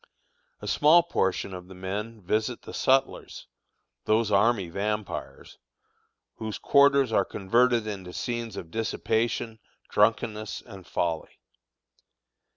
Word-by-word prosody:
A -, -, -5 dB
small 160 Hz, +4 st, +5 dB
portion 95 Hz, -, -1 dB
of 90 Hz, -1 st, -8 dB
the 95 Hz, -, -12 dB
men 105 Hz, +4 st, -5 dB
visit 110 Hz, +6 st, -1 dB
the -, -, -9 dB
sutlers, 135 Hz, +1 st, 0 dB, 0.6 s
those 110 Hz, 0 st, +2 dB
army 100 Hz, -1 st, +3 dB
vampires, 105 Hz, +3 st, -4 dB, 0.8 s
whose 110 Hz, -2 st, -4 dB
quarters 140 Hz, -3 st, +4 dB
are -, -, +4 dB
converted 120 Hz, +3 st, +2 dB
into 95 Hz, -4 st, -6 dB
scenes 115 Hz, +1 st, -4 dB
of 80 Hz, -, -8 dB
dissipation, 115 Hz, +1 st, -1 dB, 0.3 s
drunkenness, 105 Hz, 0 st, +1 dB
and 95 Hz, -2 st, -12 dB
folly. 85 Hz, -2 st, -2 dB
110 Hz, 110 wpm, -27 LUFS, 95-120 Hz, 0.8 s, small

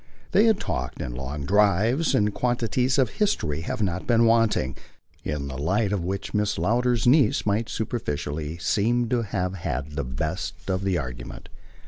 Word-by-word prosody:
They 205 Hz, +4 st, +5 dB
had 220 Hz, -3 st, +3 dB
talked, -, -, -3 dB
in -, -, -4 dB
long 65 Hz, +3 st, -5 dB
drives, 105 Hz, -, +3 dB
and 105 Hz, -1 st, +2 dB
quantities 125 Hz, +2 st, 0 dB
of 130 Hz, -4 st, +2 dB
history 195 Hz, -, 0 dB
had 85 Hz, -, -4 dB
not 90 Hz, -2 st, -2 dB
been 115 Hz, -1 st, +4 dB
wanting 115 Hz, -, +2 dB, 0.5 s
in 75 Hz, -2 st, -3 dB
the 65 Hz, 0 st, -6 dB
light 95 Hz, +7 st, +1 dB
of 95 Hz, -4 st, -1 dB
which 95 Hz, +2 st, -4 dB
Mrs. 105 Hz, 0 st, 0 dB
Lowder's 120 Hz, +6 st, +1 dB
niece 130 Hz, -2 st, +4 dB
might 105 Hz, +2 st, 0 dB
superficially 75 Hz, -8 st, -3 dB
seem 120 Hz, +7 st, +1 dB
to 125 Hz, -1 st, +1 dB
have 95 Hz, -3 st, -2 dB
had 75 Hz, -6 st, -4 dB
the 75 Hz, -1 st, -3 dB
best 75 Hz, +8 st, -3 dB, 0.2 s
of 95 Hz, +1 st, -1 dB
the 95 Hz, -2 st, +1 dB
argument. 65 Hz, -5 st, -6 dB
100 Hz, 165 wpm, -25 LUFS, 75-115 Hz, 0.5 s, They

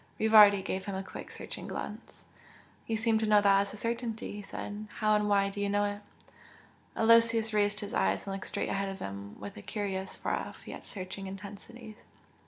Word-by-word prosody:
Rivardi 210 Hz, -3 st, +7 dB
gave 190 Hz, 0 st, -3 dB
him 200 Hz, -, -3 dB
a 190 Hz, -, -3 dB
quick 190 Hz, -, -9 dB
searching -, -, -7 dB
glance. -, -, -7 dB, 0.6 s
"You 225 Hz, -, 0 dB
seem 225 Hz, 0 st, +2 dB
to 220 Hz, -, 0 dB
know 210 Hz, -1 st, +6 dB
that 200 Hz, -1 st, +5 dB
as 200 Hz, -, -3 dB
a -, -, -7 dB
certainty" 230 Hz, 0 st, -3 dB
he 205 Hz, -, -6 dB
said, 205 Hz, +1 st, -6 dB
"How 215 Hz, -1 st, +2 dB
and 210 Hz, 0 st, +2 dB
why 200 Hz, -1 st, +3 dB
do 205 Hz, -, -5 dB
you 200 Hz, -, 0 dB
know 205 Hz, 0 st, +2 dB
it?" 205 Hz, 0 st, -2 dB, 1.0 s
Aloysius 230 Hz, 0 st, +4 dB
raised 205 Hz, -1 st, +2 dB
his 205 Hz, -, -6 dB
eyes 95 Hz, 0 st, +1 dB
and 195 Hz, -, -4 dB
looked 195 Hz, -, -6 dB
straight -, -, -2 dB
ahead 195 Hz, 0 st, -1 dB
of 195 Hz, -, -6 dB
him 100 Hz, -, -7 dB
with 100 Hz, +1 st, -8 dB
a -, -, -7 dB
curious, 195 Hz, -, -3 dB
far -, -, -2 dB
off, -, -, -8 dB
yet -, -, -8 dB
searching 195 Hz, 0 st, -6 dB
intensity. 210 Hz, +3 st, -9 dB
205 Hz, 200 wpm, -30 LUFS, 195-215 Hz, 1.0 s, Rivardi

